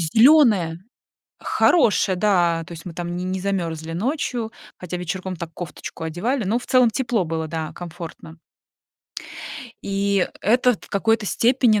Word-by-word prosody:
зелёное. 210 - +5 0.6
Хорошее, 210 - +3
да. 175 -4 +2
То 175 - -10
есть 165 -1 -9
мы 175 - -7
там 175 0 -4
не 180 - -3
не 185 0 -2
замёрзли 165 -5 -2
ночью. 235 - -2 0.3
Хотя 180 0 -5
вечерком 180 +1 -4
так 165 0 -6
кофточку 165 -1 -7
одевали, 215 - -1
но 220 +6 +1
в - - -11
целом 250 -3 +5
тепло 235 -4 0
было, 160 0 -2
да, 160 -1 -4
комфортно. 170 -1 -9 1.4
И 200 -1 +1
это 245 +2 +3
т - - -16
в - - -21
какой-то 220 +1 +1
степени 235 -1 +3
190 Hz, 145 wpm, -22 LUFS, 170-225 Hz, 1.4 s, зелёное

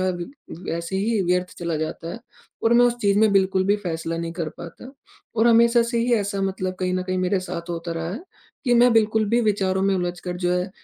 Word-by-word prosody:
है 185 0 +1 0.4
वैसे 170 +1 -4
ही 215 +2 +1
व्यर्थ 180 +1 0
चला 170 -2 -2
जाता 160 +2 -4
है - - -7 0.4
और 225 - +3
मैं 245 - +6
उस 240 - +1
चीज़ 200 -1 +2
में 220 -1 +5
बिल्कुल 190 -1 +2
भी 205 +2 +3
फैसला 165 -4 -4
नहीं 165 0 -4
कर 165 -2 -3
पाता। 170 +9 -10 0.5
और 225 +2 +4
हमेशा 235 +1 +5
से 235 0 -1
ही 240 +1 +1
ऐसा 200 -2 -1
मतलब 185 -1 -2
कहीं 185 0 0
ना 185 - -1
कहीं 185 0 -2
मेरे 185 +1 +1
साथ 175 -2 -6
होता 170 0 -4
रहा 165 0 -4
है, 225 - -5 0.4
कि 245 -2 +3
मैं 240 0 +5
बिल्कुल 220 -1 +3
भी 235 +2 +3
विचारों 195 -4 +1
में 195 0 +2
उलझकर 180 0 -3
जो 180 0 0
है 180 +1 -1
190 Hz, 225 wpm, -23 LUFS, 175-220 Hz, 0.5 s, मैं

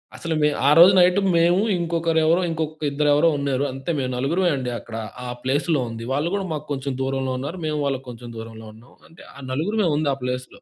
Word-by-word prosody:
అసలు 165 -1 -3
మే 150 - +4 0.2
ఆ - - +7
రోజు 175 +3 +9
నైట్ 180 +2 +5 0.2
మేము 175 +4 +3
ఇంకొకరెవరో 165 0 +1
ఇంకొక 155 -1 -4
ఇద్దరెవరో 150 +2 +3
ఉన్నారు. 140 -1 -1
అంతే 135 +6 -4
మేము 130 -2 -2
నలుగురమే 170 +8 +1
అండి. 125 -2 -3
అక్కడ 115 - -10 0.3
ఆ - - -5
ప్లేస్‌లో 145 +2 0
ఉంది. 115 0 -7
వాళ్ళు 150 +5 0
కూడా 195 - -2
మాకు 150 0 -5
కొంచెం 135 -1 -3
దూరంలో 135 -1 -1
ఉన్నారు. 150 +8 -5
మేము 150 -1 -1
వాళ్ళకి 135 -1 -2
కొంచెం 120 0 -9
దూరంలో 110 0 -9
ఉన్నాం. 115 +3 -18
అంటే 165 - -16
ఆ - - -13
నలుగురమే 185 +8 0
ఉంది 150 -2 0
ఆ - - -2
ప్లేస్‌లో. 125 - -5
145 Hz, 200 wpm, -22 LUFS, 130-165 Hz, 0.3 s, రోజు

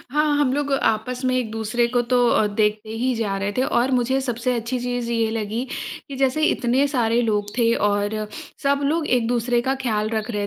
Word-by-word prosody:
हाँ, 300 0 +2
हम 280 -3 +2
लोग 285 0 -1
आपस 250 0 0
में 255 - +2
एक-दूसरे 225 0 0
को 245 0 +1
तो 245 -1 +4
अ, 215 - +3
देखते 210 +1 0
ही 255 0 +1
जा 210 -4 -1
रहे 200 +1 -2
थे। 255 - +3
और 245 0 +1
मुझे 260 +1 +1
सबसे 250 -1 -1
अच्छी 235 +2 -2
चीज़ 245 -1 -2
ये 225 -1 +1
लगी 220 +2 -2 0.4
कि 275 - -6
जैसे 270 +3 +1
इतने 260 -1 +2
सारे 240 -4 +1
लोग 210 -3 0
थे, 230 -1 +4
और 205 +1 0 0.4
सब 280 0 +2
लोग 310 +2 0
एक-दूसरे 240 0 +1
का 270 - +2
ख़्याल 220 -5 -1
रख 220 0 -2
रहे 205 -2 -2
240 Hz, 200 wpm, -22 LUFS, 220-260 Hz, 0.4 s, तो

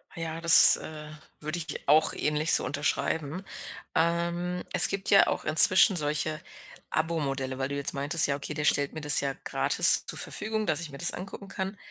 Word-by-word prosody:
Ja, 165 0 -7
das, 170 -1 +8
äh, 150 -1 -11 0.3
würde 155 +3 -6
ich 165 -1 -7
dir - - -6
auch 155 +2 +2
ähnlich 150 +2 -1
so - - +3
unterschreiben. 150 +5 -4 0.5
Ähm, 170 +2 -3
es 180 - +5
gibt 195 0 -1
ja 200 - +4
auch - - -4
inzwischen 185 +6 +6
solche 155 0 -3 0.5
Abo-Modelle, 135 -5 -4
weil 135 +1 -5
du 140 - -6
jetzt 140 0 -3
meintest: 145 +3 +1
„Ja, 140 - -2
okay, 145 +1 -7
der 150 0 -5
stellt 145 -1 0
mir 155 - -8
das 150 -2 +3
ja 135 -1 -4
gratis - - +1
zur - - -6
Verfügung, 215 -1 -4
dass 155 0 -2
ich 160 - -8
mir 140 - -11
das - - -1
angucken 195 +1 -10
kann.“ 190 +1 -7
155 Hz, 190 wpm, -25 LUFS, 145-175 Hz, 0.5 s, das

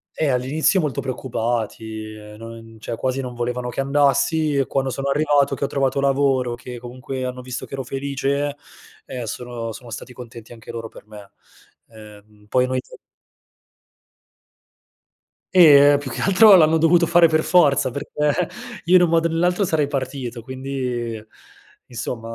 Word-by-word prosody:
Eh, 155 - 0
all'inizio 135 +9 +1
molto 150 -6 -2
preoccupati, 115 -3 -4
ehm, 105 0 -12
non 115 0 -11
cioè, 115 - -5
quasi 130 +3 -2
non 125 -1 -7
volevano 125 +1 -3
che 125 - -3
andassi, 145 +2 +1
e 135 - +2
quando 135 0 -1
sono 135 +2 -3
arrivato 145 -1 +2
che 135 - -4
ho - - +1
trovato 135 -1 0
lavoro, 135 -3 +1
che 125 0 -9
comunque 130 +2 -7
hanno 125 0 -5
visto 125 0 -6
che - - -14
ero 135 -1 -3
felice 140 +2 -2 0.5
e 125 -2 -6
eh, 115 - -6
sono 120 0 -5
sono 120 +1 -11
stati 125 - -8
contenti 120 -2 -11
anche 115 -2 -11
loro 115 -1 -6
per - - -15
me. 105 -2 -13 0.6
Ehm, 105 -1 -16
poi 125 0 +2
noi 130 0 -1 2.7
Eh, 145 -5 +7
più 135 -3 -7
che - - -6
altro, 195 +1 +7
l'hanno 160 -2 +5
dovuto 170 +2 +4
fare 170 0 +5
per 155 0 +2
forza, 150 -7 +3
perché 150 +5 -2 0.4
io 180 +2 +4
in 180 - +7
un 175 - +3
modo 165 0 +2
o - - -5
nell'altro 180 +4 +1
sarei 155 -4 0
partito, 130 -3 -4
quindi, 125 -3 -5 0.6
insomma 115 -1 -6
130 Hz, 160 wpm, -21 LUFS, 120-145 Hz, 2.7 s, Eh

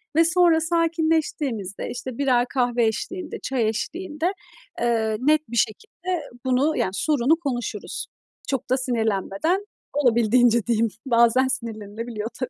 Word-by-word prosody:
Ve 330 +1 +5
sonra 340 -1 +4
sakinleştiğimizde, 320 - 0
işte, 245 0 -6
birer 255 -3 +3
kahve 245 -2 +2
eşliğinde, 325 - -3
çay 250 -4 0
eşliğinde, 325 - -2 0.5
eee, 220 -2 +1
net 305 +4 +3
bir 235 - -3
şekilde 350 - -1 0.2
bunu, 270 +5 +2
yani, 190 - +1
sorunu 290 +6 +2
konuşuruz. 245 -8 -4 0.4
Çok 270 -3 -2
da 255 - +3
sinirlenmeden. 240 - 0 0.3
Olabildiğince 235 -3 +3
diyeyim, 230 -1 +2 0.2
bazen 235 +1 +4
sinirlenilebiliyor 225 -2 -4
tabii. 255 - -2
250 Hz, 120 wpm, -24 LUFS, 230-315 Hz, 0.5 s, Ve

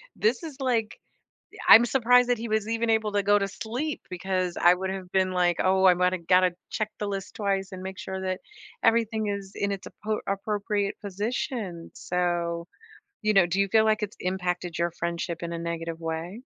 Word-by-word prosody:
this 230 +9 +1
is, 300 -4 -7
like 235 -4 -1 0.7
I'm 235 +2 +10
surprised 250 0 +4
that 245 - +3
he 230 +1 -5
was 215 0 0
even 230 0 -1
able 220 -2 +1
to 205 -1 +2
go 205 +1 +5
to 195 - 0
sleep, 240 +9 -4
because 185 -1 -2
I 175 +1 +7
would 190 +1 -3
have 190 -1 -5
been 185 -1 +2
like, 175 -2 +2
"Oh, 190 0 +3
I 180 - +8
might've 180 -1 0
gotta 180 -1 +4 0.2
check 215 -1 -2
the 210 - -2
list 195 -1 -5
twice, 195 -2 -1
and 185 0 -7
make 190 0 -6
sure 190 0 -5
that 185 0 -3 0.4
everything 225 -1 +2
is 200 -1 -4
in 200 0 -1
its 195 -1 -5
apo 215 0 -3
appropriate 205 0 -1
position," 200 -3 -4
so, 175 -1 -1 0.6
you 215 -1 +2
know, 190 -3 +6
do 190 +3 0
you 195 - +2
feel 220 +1 +4
like 215 -1 +2
it's 210 0 -4
impacted 180 -2 -2
your 170 0 +1
friendship 170 0 -3
in 170 0 -4
a 170 - -3
negative 165 0 -4
way? 165 +5 -4
195 Hz, 195 wpm, -26 LUFS, 180-215 Hz, 0.7 s, I'm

